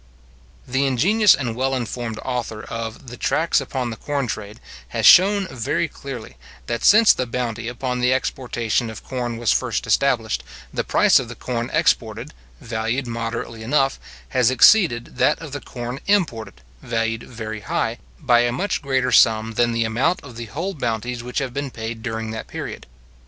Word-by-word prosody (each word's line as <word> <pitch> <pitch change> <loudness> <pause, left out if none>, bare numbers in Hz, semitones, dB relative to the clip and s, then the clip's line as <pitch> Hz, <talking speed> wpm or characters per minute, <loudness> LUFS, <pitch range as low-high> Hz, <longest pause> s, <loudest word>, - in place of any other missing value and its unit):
The 130 +2 +1
ingenious 195 - +4
and 120 -5 -3
well 135 +2 0
informed 120 -2 -4
author 120 -4 -3
of 115 +2 -6
the 125 - -9
Tracts 160 -2 +1
upon 130 -2 -3
the - - -5
Corn 140 +3 -2
Trade 110 -1 -6 0.3
has - - -2
shown 195 +1 +7
very 125 +6 -1
clearly, 125 - -9 0.3
that 115 - -3
since 215 +1 +7
the 125 - -2
bounty 115 -1 -3
upon 125 +1 -3
the 125 +1 +2
exportation 120 -3 -1
of 110 - -9
corn 120 -3 -4
was 115 -2 +1
first - - 0
established, 65 +2 +1 0.3
the - - -1
price - - +4
of - - -5
the - - -7
corn 120 -1 -3
exported, 120 -5 0 0.3
valued 115 +1 -2
moderately 115 0 -4
enough, 135 +3 +1 0.3
has 125 -2 +3
exceeded 130 - +4
that - - +3
of 165 -3 -9
the 145 0 -5
corn 120 +1 -6
imported, 155 - 0 0.2
valued 115 -1 -1
very 110 -3 -7
high, 115 +2 -2 0.2
by 125 -5 +4
a 120 0 +2
much 195 +11 -1
greater 130 -2 0
sum 110 -1 +4
than 120 +1 +2
the 115 0 +1
amount 130 +11 +1
of 125 -4 -11
the 115 0 -6
whole 165 - -4
bounties 120 - -3
which 125 +1 -7
have 135 -4 -1
been 140 +1 -3
paid 115 -1 -6
during 110 -1 -4
that 110 - -6
period. - - -7
120 Hz, 175 wpm, -22 LUFS, 115-135 Hz, 0.3 s, shown